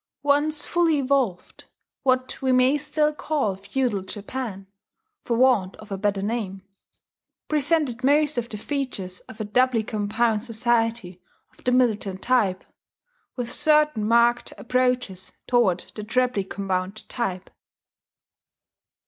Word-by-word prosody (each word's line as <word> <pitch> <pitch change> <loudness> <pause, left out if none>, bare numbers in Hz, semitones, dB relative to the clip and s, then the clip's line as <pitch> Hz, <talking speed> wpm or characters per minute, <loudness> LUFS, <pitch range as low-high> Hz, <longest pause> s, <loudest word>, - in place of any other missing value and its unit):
Once 290 +1 +2
fully 335 -3 +2
evolved, 260 -9 -1 0.4
what 255 -1 0
we 260 -1 +1
may 255 +2 +4
still 300 +1 +1
call 290 -10 -1
Feudal 200 +2 -1
Japan, 200 +1 -6 0.6
for 235 - -1
want 240 -7 +3
of 215 -1 -14
a 195 - -2
better 200 -1 0
name, 200 -3 -3 0.8
presented 295 -4 +1
most 295 +2 +3
of 240 -1 -2
the 215 - -5
features 210 -8 -4
of 220 - -11
a - - -1
doubly 245 +1 +2
compound 215 +1 0
society 230 -5 0 0.3
of - - -22
the 250 - +3
militant 215 -6 +1
type, 215 -7 +2 0.7
with 245 -2 -3
certain 300 -7 +3
marked 235 +2 +3
approaches 250 -6 -1
toward 215 -8 +2
the 210 - -6
trebly 250 -1 +1
compound 190 +2 -3
type. 190 -6 -4
235 Hz, 125 wpm, -24 LUFS, 205-260 Hz, 0.8 s, may